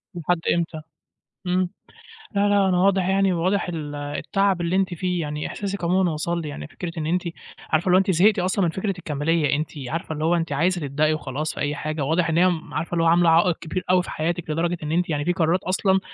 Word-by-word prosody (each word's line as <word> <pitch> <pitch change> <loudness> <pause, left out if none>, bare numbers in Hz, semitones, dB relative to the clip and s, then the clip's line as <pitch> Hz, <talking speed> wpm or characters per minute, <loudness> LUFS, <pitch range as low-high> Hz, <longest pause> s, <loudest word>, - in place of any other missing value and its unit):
لحد 175 0 0
إمتى؟ 165 -2 -2 0.7
إمم، 180 0 +1 0.7
لا، 200 +1 +3
لا، 200 -1 +3
أنا 180 - +2
واضح 190 0 +3
يعني 195 0 +3
واضح 185 +3 0
ال 150 -4 -5
التعب 175 +6 -1
اللي 170 +2 0
أنتِ 190 -1 +1
فيه، 180 0 -1
يعني 150 -1 -3
إحساسِك 200 -2 -5
عمومًا 180 +1 +2
وصل 170 +3 -2
لي، 155 - -5
يعني 145 - -7
فكرة 170 +2 -6
إن 155 - -2
أنتِ 175 +3 +1 0.5
عارفة 155 +1 +1
اللي 180 - +5
هو - - +7
أنتِ 195 0 +2
زهقتِ 195 +5 +4
أصلًا 185 +1 +1
من - - +1
فكرة 195 +3 -2
الكمالية، 150 -1 0
أنتِ 150 +1 -2 0.2
عارفة 160 +2 -3
اللي 155 0 -2
هو 170 +2 +3
أنتِ 165 -3 -2
عايزه 175 +5 +1
تبدئي 150 +2 +1
وخلاص 155 0 -3
في - - -9
أي 145 +1 -1
حاجة، 155 0 -3
واضح 160 +4 +1
إن 160 - +1
هي 180 +2 +5
م 170 -2 -4
عارفة 165 - -3
اللي 165 -1 +2
هو - - +3
عاملة 170 +1 +5
عائق 170 +1 +4
كبير 180 +3 -4
أوي 180 0 +4
في - - -8
حياتِك، 165 +1 -2
لدرجة 170 +3 0
إن 150 - -3
أنتِ 175 +2 +1
يعني 145 -2 -1
في 175 - +2
قرارات 175 0 +1
أصلًا 190 +1 +2
170 Hz, 235 wpm, -23 LUFS, 155-185 Hz, 0.7 s, هو